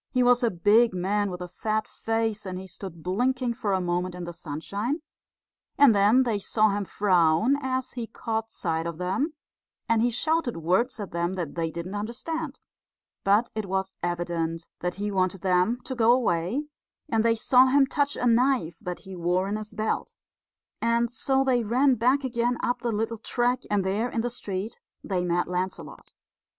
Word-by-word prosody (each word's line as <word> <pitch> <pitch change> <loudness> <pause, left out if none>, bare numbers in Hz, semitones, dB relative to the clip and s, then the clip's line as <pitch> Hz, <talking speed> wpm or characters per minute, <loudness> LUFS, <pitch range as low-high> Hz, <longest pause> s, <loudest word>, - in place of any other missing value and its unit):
He 255 -1 +2
was 245 0 +5
a 235 - +3
big 210 +4 +4
man 200 +3 0
with 180 -1 -6
a 180 - -4
fat 215 +4 -2
face, 225 -1 -2
and 185 -1 -5
he 190 - -7
stood 180 -3 -9
blinking 250 +6 0
for 220 -4 -2
a 190 - +2
moment 180 0 -1
in 180 - -6
the 175 0 -6
sunshine; 200 - -4 0.7
and 280 -5 +7
then 210 +6 +5
they 225 -5 0
saw 215 +2 +2
him 200 0 -2
frown 185 - +3
as 260 -1 -2
he 235 -2 -5
caught 225 0 -3
sight 165 -6 -2
of 170 -2 -5
them; 195 - -1 0.5
and 230 -1 +3
he 240 - +3
shouted 295 - 0
words 185 +10 +1
at 200 -4 -5
them 170 +2 -1
that 175 -6 -4
they 165 -1 -1
didn't 170 +4 -6
understand. 260 +8 -4 0.6
But 210 +4 +3
it 215 -2 -3
was 190 0 -2
evident 170 -1 -2
that 180 0 -2
he 205 +1 -3
wanted 185 -1 0
them 185 +6 +2
to 265 - -4
go 235 -2 +4
away, 225 - +1 0.4
and 225 -6 +1
they 230 0 +3
saw 255 +3 +5
him 275 +1 +5
touch 285 +1 0
a - - -2
knife 235 - +2
that 180 -1 -6
he 190 -2 -9
wore 180 +2 0
in 205 - -2
his 215 0 -7
belt; 215 0 -2 0.7
and 235 0 +2
so 270 +1 +2
they 250 -3 +2
ran 255 +5 +3
back 255 +4 +2
again 240 -1 0
up 245 - 0
the 240 - -2
little 225 +1 -2
track, 245 +2 0
and 205 -2 +1
there 210 +6 0
in 230 - -1
the 245 +1 -2
street 205 -2 -5 0.2
they 185 -3 -1
met 175 0 0
Lancelot. 180 +1 -5
215 Hz, 185 wpm, -26 LUFS, 180-245 Hz, 0.7 s, and